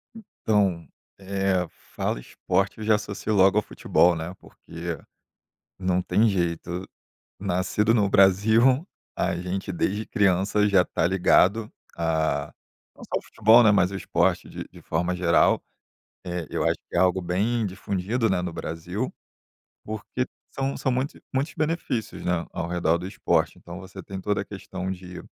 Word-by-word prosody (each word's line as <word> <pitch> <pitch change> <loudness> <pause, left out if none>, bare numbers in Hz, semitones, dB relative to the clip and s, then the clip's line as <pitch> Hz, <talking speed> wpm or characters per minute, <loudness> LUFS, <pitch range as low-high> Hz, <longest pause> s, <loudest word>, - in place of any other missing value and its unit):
Então, 100 - 0 0.3
eh, 95 -2 0 0.3
fala - - -1
"esporte" 95 +9 -1
eu - - -5
já 110 0 +4
associo 105 +1 -3
logo 95 0 +5
ao 105 - +3
futebol, 85 0 +2
né, 80 +2 -5
porque - - -7 0.8
não 90 -1 +1
tem 110 +5 +3
jeito, 85 -1 -2 0.5
nascido 95 +3 +1
no 105 -4 +3
Brasil 110 - +4 0.3
a - - 0
gente 90 +2 -4
desde 100 +5 -1
criança 100 +1 +2
já 95 -3 +5
tá 80 - 0
ligado 95 +4 +3 0.3
a 80 -1 0 0.4
não - - -15
só - - -2
o - - -15
futebol 115 +3 +5
né, 110 - +6
mas 95 -3 +3
o 100 - -4
esporte - - 0
de - - -7
de - - -15
forma 85 +3 -1
geral, 85 -2 +3 0.6
eh, 90 -2 -4
eu - - -1
acho - - +2
que - - -13
é - - +3
algo 95 +1 +3
bem 105 +6 0
difundido 100 +4 -1
né, 95 -2 +1
no 90 -1 -3
Brasil, 85 +7 -4 0.7
porque 110 +4 -3 0.2
são 135 0 -2
são 130 - -1
muitos 130 +4 -2
muitos 135 +4 -1
benefícios, 155 -7 -2
né, 90 -1 0
ao 85 - -3
redor 85 -1 +1
do 90 - -6
esporte. 95 - 0
Então 85 +1 -9
você 95 0 -10
tem 95 +2 -7
toda 105 +1 0
a - - -9
questão 95 -2 -6
de 90 -1 -7
95 Hz, 160 wpm, -25 LUFS, 90-105 Hz, 0.8 s, né